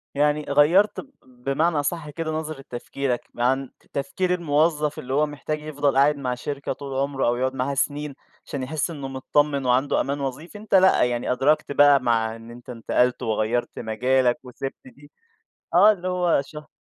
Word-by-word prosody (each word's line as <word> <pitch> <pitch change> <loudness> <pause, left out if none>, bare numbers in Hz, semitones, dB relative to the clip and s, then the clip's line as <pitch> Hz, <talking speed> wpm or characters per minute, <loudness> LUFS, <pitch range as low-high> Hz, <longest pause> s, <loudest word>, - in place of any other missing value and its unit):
يعني 150 +1 +2
غيّرت 160 +9 +4
ب 275 - -10
بمعنى 135 +6 -1
أصَح 150 +1 -2
كده 160 +1 -4
نظرة 155 -2 -4
تفكيرك 125 +1 -3
عن 130 +2 0 0.2
تفكير 180 +6 -1
الموظّف 155 -2 +1
اللي 130 +1 -5
هو 150 +2 +3
محتاج 150 +1 -5
يفضل 145 -2 -1
قاعد 145 +2 +4
مع 125 -3 -2
شركة 140 +2 -4
طول 135 -1 -5
عُمره 140 -2 -1
أو 120 - +2
يقعد 130 +2 -1
معاها 135 +2 -1
سِنين، 145 +1 -2 0.3
عشان 140 -2 -5
يحِس 150 +5 -2
إنه 140 -4 -6
مطمِّن 140 +1 0
وعنده 125 +3 +2
أمان 140 +1 -2
وظيفي، 140 +8 -5
أنت 210 -1 -1
لأ، 190 -6 +5
يعني 120 0 -1
أدركت 140 +4 +1
بقى 145 0 +6
مع 115 -2 +1
إن 115 +1 -12
أنت 120 +1 -13
انتقلت 125 +1 0
وغيّرت 110 +2 -1
مجالك 125 +3 +1
وسِبت 130 +2 -6
دي 140 +3 -16 0.6
آه، 205 +5 +7
اللي 185 -2 -5
هو 180 -5 +2
شه 150 +1 -11
140 Hz, 170 wpm, -24 LUFS, 125-150 Hz, 0.6 s, آه